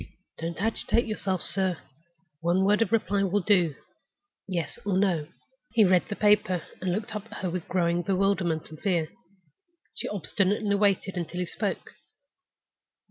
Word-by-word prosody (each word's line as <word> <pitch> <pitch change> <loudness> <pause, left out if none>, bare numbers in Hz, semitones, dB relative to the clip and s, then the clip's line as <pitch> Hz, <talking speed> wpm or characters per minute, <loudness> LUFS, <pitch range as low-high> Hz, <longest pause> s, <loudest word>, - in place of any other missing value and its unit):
Don't 165 +1 -4
agitate 225 +2 +1
yourself, 195 -4 -2
sir! 190 -3 +2 0.6
One 175 +4 +2
word 210 +2 +3
of 225 - +1
reply 205 -3 +2
will 200 0 +1
do—Yes 180 - -2
or 200 -2 0
No." 180 -6 +1 0.5
He 225 -3 +6
read 180 -1 +4
the 205 - -3
paper, 205 -5 +3 0.2
and 185 -1 0
looked 210 +3 -3
up 210 +1 -5
at 225 - -9
her 180 - -1
with 180 -1 -4
growing 175 -1 +1
bewilderment 185 -3 0
and 155 - -10
fear. 170 -6 0 0.8
She - - -4
obstinately 205 +2 0
waited 200 -2 +1
until 175 +1 -4
he - - 0
spoke. - - -3
190 Hz, 145 wpm, -27 LUFS, 175-205 Hz, 0.8 s, He